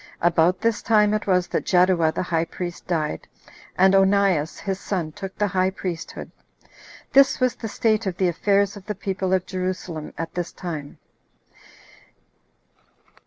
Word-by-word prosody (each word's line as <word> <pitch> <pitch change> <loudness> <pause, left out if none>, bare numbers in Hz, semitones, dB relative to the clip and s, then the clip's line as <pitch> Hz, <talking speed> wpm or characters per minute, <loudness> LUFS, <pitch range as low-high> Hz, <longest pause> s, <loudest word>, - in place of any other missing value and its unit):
About 175 +1 +3
this 230 -1 +1
time 210 -2 +3
it 215 - -2
was 180 -2 +3
that - - -1
Jaddua 180 -3 +3
the - - -1
high 165 -2 0
priest 175 0 -7
died, 155 -4 -2 0.5
and 190 +1 +5
Onias 195 -5 +3
his 195 -1 -3
son 175 -7 -3
took 195 +4 -8
the 210 - +2
high 185 -1 +1
priesthood. 180 -3 -6 0.8
This 275 0 +5
was 255 -1 +2
the 225 - -6
state 215 -1 +1
of 180 -2 -3
the 185 - +2
affairs 200 +3 +1
of 200 -2 -12
the 210 - -3
people 190 -1 -3
of 185 -1 +1
Jerusalem 185 -4 -4
at 165 0 -5
this 175 -1 -3
time. 155 -6 -7
185 Hz, 155 wpm, -23 LUFS, 175-200 Hz, 0.8 s, and